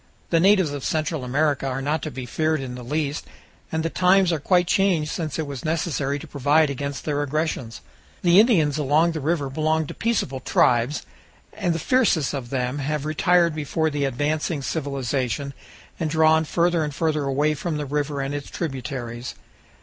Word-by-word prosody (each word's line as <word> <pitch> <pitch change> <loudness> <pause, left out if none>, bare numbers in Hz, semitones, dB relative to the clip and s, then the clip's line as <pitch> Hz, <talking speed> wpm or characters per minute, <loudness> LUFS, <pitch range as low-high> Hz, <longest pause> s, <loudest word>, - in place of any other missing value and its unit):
The 165 - +4
natives 190 -3 +4
of 145 -2 -5
Central 155 -2 -1
America 140 +1 0
are 130 0 -2
not 145 +4 -1
to 155 - -4
be 130 -3 -6
feared 155 +5 0
in 130 -2 -5
the 125 - -7
least, 145 +3 -2 0.4
and 160 0 -1
the 165 - 0
times 185 0 +4
are 160 - -1
quite 180 +4 +3
changed 170 -5 +2
since 155 -4 -3
it 160 - -2
was 140 -3 -7
necessary 155 -3 -1
to - - -9
provide 145 +2 +2
against 140 +1 -5
their 145 -1 0
aggressions. 145 -5 -2 0.4
The 175 +1 +6
Indians 160 - +4
along 150 +4 +3
the 160 - -4
river 150 -1 0
belong 155 +3 0
to - - -7
peaceable 220 - -1
tribes, 125 +1 +2 0.5
and 170 -2 -1
the - - 0
fiercest 195 - +2
of 130 -4 -5
them 125 +1 -2
have 145 +1 -2
retired 170 +2 +3
before 155 +1 -1
the 145 -1 -1
advancing 145 +3 -1
civilization, 140 -2 -2 0.5
and 160 -3 -1
drawn 160 0 +4
further 170 +1 +1
and 150 -2 -4
further 155 -3 0
away 145 +3 +1
from 155 +1 -3
the 150 - -3
river 145 0 -2
and 135 +1 -3
its 145 -1 -5
tributaries. 125 -5 -5
150 Hz, 180 wpm, -23 LUFS, 140-160 Hz, 0.5 s, The